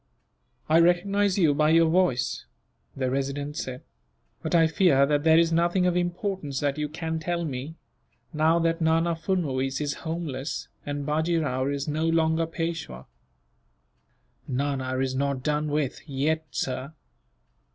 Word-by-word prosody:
"I 160 Hz, +2 st, +5 dB
recognize 190 Hz, +3 st, +3 dB
you 160 Hz, -6 st, +4 dB
by 150 Hz, +2 st, +2 dB
your 165 Hz, +1 st, +5 dB
voice," 160 Hz, -7 st, +1 dB, 0.5 s
the 130 Hz, -2 st, -1 dB
Resident 140 Hz, +2 st, -2 dB
said; 130 Hz, -3 st, -5 dB, 0.6 s
"but -, -, -1 dB
I 165 Hz, -1 st, +6 dB
fear 160 Hz, -4 st, +4 dB
that 145 Hz, 0 st, +1 dB
there 160 Hz, 0 st, +6 dB
is 165 Hz, 0 st, +4 dB
nothing 175 Hz, +2 st, +2 dB
of 180 Hz, -1 st, +2 dB
importance 175 Hz, -5 st, -2 dB
that 145 Hz, 0 st, -1 dB
you 150 Hz, -1 st, -2 dB
can 160 Hz, +1 st, -3 dB
tell 170 Hz, +1 st, -2 dB
me; 140 Hz, +2 st, -5 dB, 0.6 s
now 160 Hz, +2 st, +3 dB
that 165 Hz, 0 st, 0 dB
Nana 165 Hz, +1 st, +2 dB
Furnuwees 140 Hz, -7 st, -1 dB
is 145 Hz, -1 st, -1 dB
homeless, 160 Hz, -4 st, -4 dB, 0.2 s
and 145 Hz, 0 st, -3 dB
Bajee 160 Hz, +3 st, +1 dB
Rao 130 Hz, -4 st, -1 dB
is 140 Hz, 0 st, -2 dB
no 155 Hz, +2 st, 0 dB
longer 165 Hz, 0 st, +2 dB
Peishwa." 165 Hz, -, -4 dB, 1.4 s
"Nana 130 Hz, -1 st, -2 dB
is 130 Hz, 0 st, 0 dB
not 140 Hz, -1 st, -1 dB
done 150 Hz, +1 st, 0 dB
with, 145 Hz, -3 st, -1 dB
yet, 155 Hz, +4 st, -1 dB
sir." 130 Hz, +3 st, -3 dB
155 Hz, 145 wpm, -26 LUFS, 140-165 Hz, 1.4 s, I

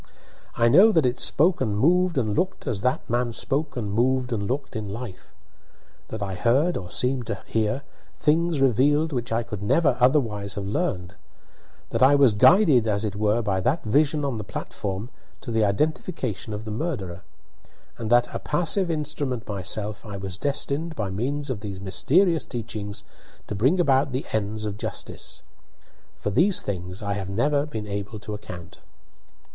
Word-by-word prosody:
I 115 Hz, -, +4 dB
know 190 Hz, -, +7 dB
that 160 Hz, -6 st, +4 dB
it 125 Hz, 0 st, 0 dB
spoke 175 Hz, +4 st, +3 dB
and 105 Hz, -2 st, 0 dB
moved 175 Hz, -, +3 dB
and 110 Hz, -5 st, 0 dB
looked 185 Hz, -, -1 dB
as 115 Hz, -8 st, -2 dB
that 125 Hz, +3 st, 0 dB
man 120 Hz, 0 st, 0 dB
spoke 145 Hz, +5 st, -1 dB
and 105 Hz, -4 st, -3 dB
moved 125 Hz, +2 st, +1 dB
and 100 Hz, -3 st, -2 dB
looked 135 Hz, +4 st, -3 dB
in 105 Hz, -2 st, -4 dB
life; 110 Hz, -3 st, -8 dB, 0.8 s
that 110 Hz, -2 st, -5 dB
I 95 Hz, -1 st, -3 dB
heard, 130 Hz, -, +2 dB
or 90 Hz, -2 st, -5 dB
seemed 125 Hz, +1 st, 0 dB
to -, -, -4 dB
hear, 115 Hz, +5 st, -1 dB, 0.3 s
things 160 Hz, 0 st, +2 dB
revealed 145 Hz, +5 st, +3 dB
which 120 Hz, -2 st, -3 dB
I 115 Hz, +1 st, +1 dB
could 105 Hz, -3 st, -6 dB
never 135 Hz, +5 st, +2 dB
otherwise 115 Hz, -7 st, +2 dB
have 100 Hz, -, -4 dB
learned; 95 Hz, -2 st, -2 dB, 0.8 s
that 115 Hz, -, -1 dB
I 135 Hz, +2 st, +7 dB
was 135 Hz, -6 st, +5 dB
guided, 140 Hz, -, +5 dB
as 105 Hz, 0 st, +1 dB
it 100 Hz, -2 st, -3 dB
were, 105 Hz, +3 st, +1 dB
by 95 Hz, -3 st, 0 dB
that 130 Hz, -, 0 dB
vision 145 Hz, +6 st, +2 dB
on 130 Hz, -5 st, -2 dB
the -, -, -4 dB
platform 100 Hz, +3 st, -5 dB, 0.3 s
to 120 Hz, -, -6 dB
the 110 Hz, -1 st, +2 dB
identification 115 Hz, -, -1 dB
of 105 Hz, +1 st, -5 dB
the 110 Hz, -, -5 dB
murderer; 105 Hz, -, -3 dB, 0.8 s
and 115 Hz, -2 st, -3 dB
that, 120 Hz, +1 st, +5 dB
a -, -, -2 dB
passive 175 Hz, +4 st, 0 dB
instrument 145 Hz, -6 st, -2 dB
myself, 105 Hz, +2 st, -3 dB
I 100 Hz, -3 st, -7 dB
was 95 Hz, -2 st, -4 dB
destined, 145 Hz, +3 st, -1 dB
by 105 Hz, -6 st, -3 dB
means 135 Hz, +8 st, -2 dB
of 115 Hz, -, -3 dB
these 100 Hz, -2 st, -6 dB
mysterious 160 Hz, -, +2 dB
teachings 110 Hz, -4 st, -5 dB, 0.4 s
to -, -, -5 dB
bring 130 Hz, -, +2 dB
about 135 Hz, -4 st, +3 dB
the 130 Hz, -, -2 dB
ends 110 Hz, 0 st, -2 dB
of 105 Hz, -1 st, -4 dB
justice. -, -, -5 dB, 0.7 s
For 105 Hz, -, -3 dB
these 180 Hz, -, +3 dB
things 90 Hz, 0 st, -5 dB
I 100 Hz, 0 st, -1 dB
have 100 Hz, -2 st, -4 dB
never 140 Hz, +8 st, +1 dB
been 110 Hz, -8 st, -5 dB
able 100 Hz, +1 st, -5 dB
to 105 Hz, -, -6 dB
account. 90 Hz, -4 st, -9 dB
120 Hz, 175 wpm, -25 LUFS, 105-145 Hz, 0.8 s, know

